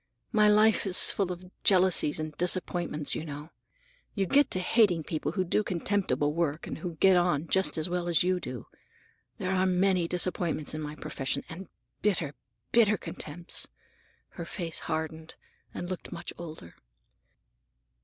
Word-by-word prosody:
My 215 Hz, -2 st, +5 dB
life 215 Hz, 0 st, +4 dB
is 185 Hz, -, +5 dB
full 195 Hz, -3 st, -1 dB
of 180 Hz, +1 st, -8 dB
jealousies 185 Hz, -5 st, +3 dB
and 155 Hz, -1 st, -5 dB
disappointments, 175 Hz, -3 st, 0 dB
you -, -, -3 dB
know. 150 Hz, 0 st, -8 dB, 0.6 s
You 195 Hz, -2 st, +1 dB
get 285 Hz, +9 st, +4 dB
to 185 Hz, -, +1 dB
hating 185 Hz, -3 st, +3 dB
people 155 Hz, 0 st, -3 dB
who 185 Hz, -, +1 dB
do 180 Hz, +4 st, +1 dB
contemptible 175 Hz, -7 st, 0 dB
work 160 Hz, -2 st, -1 dB
and -, -, -6 dB
who 175 Hz, -3 st, -5 dB
get 190 Hz, +4 st, +5 dB
on 170 Hz, -3 st, +1 dB
just 190 Hz, -1 st, +3 dB
as 155 Hz, +1 st, +2 dB
well 175 Hz, 0 st, -2 dB
as 170 Hz, -1 st, +3 dB
you 185 Hz, 0 st, +1 dB
do. 125 Hz, -8 st, -7 dB, 0.7 s
There 185 Hz, -, -2 dB
are 190 Hz, 0 st, +2 dB
many 185 Hz, -1 st, +2 dB
disappointments 175 Hz, -3 st, 0 dB
in 155 Hz, -, -4 dB
my 150 Hz, 0 st, -5 dB
profession, 140 Hz, -1 st, -3 dB
and 180 Hz, +4 st, -8 dB, 0.3 s
bitter, 175 Hz, -8 st, +1 dB, 0.4 s
bitter 215 Hz, -3 st, +4 dB
contempts!" 170 Hz, +1 st, -4 dB, 0.6 s
Her 170 Hz, -, -7 dB
face 170 Hz, -2 st, -4 dB
hardened, 160 Hz, 0 st, -4 dB, 0.4 s
and 175 Hz, -, -5 dB
looked 185 Hz, 0 st, -6 dB
much 170 Hz, -, -6 dB
older. 155 Hz, -, -9 dB
175 Hz, 155 wpm, -29 LUFS, 155-185 Hz, 0.7 s, My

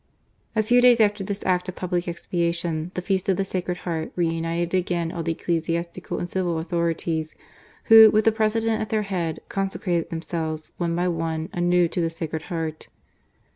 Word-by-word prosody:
A 220 Hz, -, +3 dB
few 245 Hz, +3 st, +4 dB
dajs 245 Hz, -1 st, +6 dB
after 210 Hz, -2 st, +3 dB
this 200 Hz, +1 st, -4 dB
act 180 Hz, 0 st, +1 dB
of 185 Hz, -, -6 dB
public 180 Hz, -1 st, -2 dB
expiation, 170 Hz, -1 st, -2 dB
the 180 Hz, -, -3 dB
feast 190 Hz, 0 st, 0 dB
of 190 Hz, -, +3 dB
the 195 Hz, -, 0 dB
Sacred 180 Hz, -1 st, -3 dB
Heart 160 Hz, -2 st, -3 dB
re 175 Hz, -2 st, +1 dB
united 165 Hz, +1 st, -2 dB
again 175 Hz, -2 st, 0 dB
all 170 Hz, -, -4 dB
the 165 Hz, 0 st, -1 dB
ecclesiastical 170 Hz, +1 st, -2 dB
and 175 Hz, -, -3 dB
civilauthnrities, 170 Hz, -2 st, -1 dB, 0.5 s
who, 225 Hz, -1 st, +9 dB
with 215 Hz, 0 st, +2 dB
the 225 Hz, -, +6 dB
Pre 220 Hz, 0 st, +2 dB
sident 225 Hz, 0 st, 0 dB
at 215 Hz, -, -3 dB
their 215 Hz, -1 st, +1 dB
head, 175 Hz, -5 st, -3 dB
consecrated 190 Hz, -3 st, -1 dB
themselves, 160 Hz, -1 st, -4 dB
one 170 Hz, -1 st, -1 dB
by 175 Hz, +1 st, +1 dB
one, 165 Hz, -1 st, -2 dB
anew 175 Hz, 0 st, +3 dB
to 175 Hz, -, -1 dB
the 165 Hz, -, +1 dB
Sacred 160 Hz, -1 st, -4 dB
Heart. 160 Hz, -2 st, -4 dB
175 Hz, 180 wpm, -24 LUFS, 165-195 Hz, 0.5 s, who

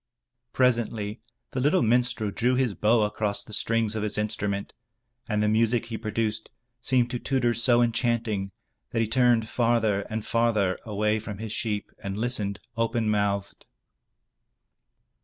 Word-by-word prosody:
Presently 115 Hz, -4 st, 0 dB, 0.3 s
the 130 Hz, -, -2 dB
little 150 Hz, +8 st, +3 dB
minstrel 120 Hz, -2 st, +2 dB
drew 125 Hz, +5 st, +1 dB
his 125 Hz, -4 st, +1 dB
bow 110 Hz, +3 st, +3 dB
across 105 Hz, -1 st, -1 dB
the 110 Hz, -, -12 dB
strings 115 Hz, 0 st, 0 dB
of 110 Hz, -, -1 dB
his 105 Hz, -1 st, -2 dB
instrument, 105 Hz, -1 st, -2 dB, 0.6 s
and 105 Hz, -1 st, +1 dB
the -, -, +2 dB
music 115 Hz, +2 st, +2 dB
he 115 Hz, -1 st, -5 dB
produced 110 Hz, 0 st, -2 dB, 0.3 s
seemed 125 Hz, -1 st, +1 dB
to 125 Hz, -, -2 dB
Tudur 125 Hz, -3 st, +1 dB
so 120 Hz, 0 st, +3 dB
enchanting, 115 Hz, -4 st, 0 dB, 0.4 s
that 115 Hz, -, 0 dB
he -, -, -1 dB
turned 120 Hz, -1 st, +3 dB
farther 115 Hz, -4 st, +1 dB
and 110 Hz, 0 st, -3 dB
farther 110 Hz, -5 st, +1 dB
away 105 Hz, 0 st, 0 dB
from 105 Hz, -2 st, -7 dB
his 110 Hz, 0 st, -5 dB
sheep 105 Hz, -2 st, -2 dB
and 100 Hz, 0 st, -5 dB
listened, 105 Hz, -4 st, -1 dB, 0.2 s
open 115 Hz, -1 st, 0 dB
mouthed. 100 Hz, -1 st, -1 dB
110 Hz, 145 wpm, -26 LUFS, 105-120 Hz, 0.6 s, little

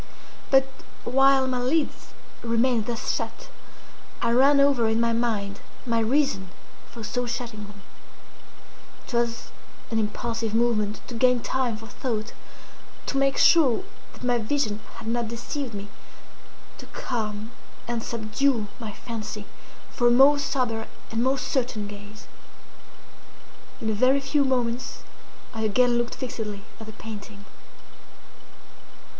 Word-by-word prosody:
But 270 Hz, -1 st, +6 dB, 0.4 s
while 270 Hz, +1 st, +5 dB
my 255 Hz, -1 st, 0 dB
lids 285 Hz, +5 st, 0 dB, 0.3 s
remained 230 Hz, -1 st, +2 dB
thus 235 Hz, -1 st, -1 dB
shut, -, -, -5 dB, 0.7 s
I -, -, +1 dB
ran 275 Hz, +4 st, +6 dB
over 275 Hz, -5 st, +4 dB
in 220 Hz, +1 st, +2 dB
my 230 Hz, 0 st, +2 dB
mind 215 Hz, -4 st, -1 dB, 0.3 s
my 230 Hz, -2 st, +1 dB
reason 230 Hz, -5 st, +1 dB, 0.4 s
for 230 Hz, -, -9 dB
so 245 Hz, +3 st, -2 dB
shutting 235 Hz, -3 st, -4 dB
them. 205 Hz, -1 st, -14 dB, 1.2 s
It -, -, -10 dB
was 235 Hz, 0 st, 0 dB, 0.4 s
an 225 Hz, -, +2 dB
impulsive 225 Hz, +1 st, -2 dB
movement 215 Hz, -3 st, +1 dB
to -, -, -7 dB
gain 250 Hz, +1 st, +4 dB
time 250 Hz, -4 st, 0 dB
for 225 Hz, -, -11 dB
thought—to 230 Hz, +3 st, -7 dB
make 275 Hz, 0 st, +2 dB
sure 315 Hz, -2 st, +5 dB, 0.3 s
that -, -, -14 dB
my 245 Hz, -1 st, +2 dB
vision 220 Hz, -2 st, 0 dB, 0.2 s
had -, -, -9 dB
not 235 Hz, 0 st, 0 dB
deceived 235 Hz, +1 st, -4 dB
me—to 205 Hz, 0 st, -14 dB
calm 215 Hz, -2 st, -4 dB, 0.4 s
and 235 Hz, -1 st, -1 dB
subdue 225 Hz, 0 st, 0 dB
my 220 Hz, -3 st, -6 dB
fancy 215 Hz, -3 st, -6 dB, 0.5 s
for 240 Hz, -, +2 dB
a -, -, +7 dB
more 270 Hz, +4 st, +7 dB
sober 245 Hz, -6 st, -1 dB, 0.2 s
and 225 Hz, 0 st, 0 dB
more 265 Hz, +2 st, +2 dB
certain 245 Hz, -5 st, -1 dB
gaze. 205 Hz, +1 st, -10 dB, 1.5 s
In 225 Hz, -, -4 dB
a -, -, 0 dB
very 255 Hz, +6 st, +4 dB
few 275 Hz, +1 st, +2 dB
moments 245 Hz, -2 st, -1 dB, 0.5 s
I 225 Hz, -, -4 dB
again 240 Hz, +3 st, +3 dB
looked 240 Hz, 0 st, -2 dB
fixedly 210 Hz, -5 st, -5 dB, 0.2 s
at 220 Hz, -, -9 dB
the 220 Hz, -, -8 dB
painting. 205 Hz, -1 st, -9 dB
235 Hz, 130 wpm, -26 LUFS, 220-255 Hz, 1.5 s, a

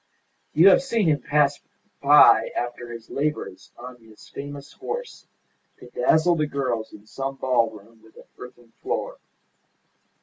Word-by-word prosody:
You 170 Hz, +6 st, +7 dB
have 190 Hz, -, +5 dB
seen 230 Hz, -8 st, -1 dB
him 145 Hz, -3 st, +1 dB
pass 145 Hz, +1 st, +1 dB, 0.4 s
by -, -, +6 dB
after 120 Hz, 0 st, -5 dB
his 115 Hz, -1 st, -11 dB
labours 150 Hz, +2 st, -4 dB
on 125 Hz, +1 st, -10 dB
his 110 Hz, -2 st, -18 dB
famous 140 Hz, 0 st, -9 dB
horse 485 Hz, +1 st, -7 dB, 0.5 s
to -, -, -15 dB
dazzle 175 Hz, -, +2 dB
the 155 Hz, -2 st, -1 dB
girls 125 Hz, -6 st, -3 dB
in 105 Hz, -, -15 dB
some 135 Hz, +4 st, -5 dB
ballroom 115 Hz, -4 st, -2 dB
with 110 Hz, 0 st, -22 dB
an -, -, -13 dB, 0.2 s
earthen 120 Hz, -2 st, -13 dB
floor. -, -, -4 dB
135 Hz, 140 wpm, -23 LUFS, 115-150 Hz, 0.5 s, You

